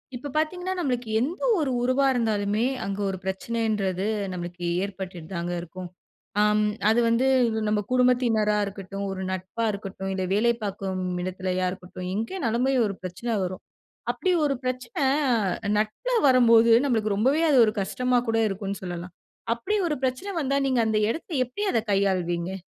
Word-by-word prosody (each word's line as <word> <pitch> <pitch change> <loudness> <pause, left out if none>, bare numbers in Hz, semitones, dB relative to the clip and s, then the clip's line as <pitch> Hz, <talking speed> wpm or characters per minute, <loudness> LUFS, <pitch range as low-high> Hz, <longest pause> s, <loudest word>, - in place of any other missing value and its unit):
இப்ப 285 +4 -6
பார்த்தீங்கன்னா, 360 +4 -1
நம்மளுக்கு 250 -7 -1
எந்த 320 - -2 0.2
ஒரு 285 -4 0
உறவா 255 +3 +2
இருந்தாலுமே, 215 -2 0 0.2
அங்க 195 0 -3
ஒரு 190 - -3
பிரச்சனைன்றது 195 -1 -1 0.3
நமக்கு 175 0 -6 0.2
ஏற்பட்டுட்டு 185 -4 -6
தாங்க 170 +1 -2
இருக்கும். 175 +1 -8 0.5
அம் 210 0 +3 0.3
அது 225 +2 +4
வந்து 230 +3 +3 0.4
நம்ப 210 0 +1
குடும்பத்தினரா 245 -4 +3
இருக்கட்டும், 195 0 -6
ஒரு 190 - -5
நட்பா 190 +5 -3
இருக்கட்டும், 195 -1 -6
இல்ல 190 -1 -2
வேலை 230 +4 +3
பார்க்கும் 190 -2 -3 0.2
இடத்திலயா 185 0 -1
இருக்கட்டும், 180 0 -8
எங்கனாலுமே 235 - 0
ஒரு 200 - -3
பிரச்சனை 185 +6 -3
வரும். 185 0 -5 0.5
அப்டி 375 - -1
ஒரு 280 -1 +1
பிரச்சன 255 +3 -3 0.8
நட்புல 215 - -1 0.2
வரும்போது, 230 -3 +6
நம்மளுக்கு 220 -6 +1
ரொம்பவே 265 +10 +2
அது 275 -4 +5
ஒரு 215 - 0
கஷ்டமா 250 +5 +1
கூட 225 - +2
இருக்கும்ன்னு 195 0 -4
சொல்லலாம். 175 0 -6 0.4
அப்டி 375 - -2
ஒரு 300 - -1
பிரச்சனை 260 +10 -1
வந்தா, 275 -1 0
நீங்க 255 -3 +2
அந்த 220 -1 +1
எடத்த 330 +6 -7
எப்படி 250 - -5
அத 230 - +3
கையாள்வீங்க? 185 -3 0
215 Hz, 145 wpm, -25 LUFS, 190-250 Hz, 0.8 s, வரும்போது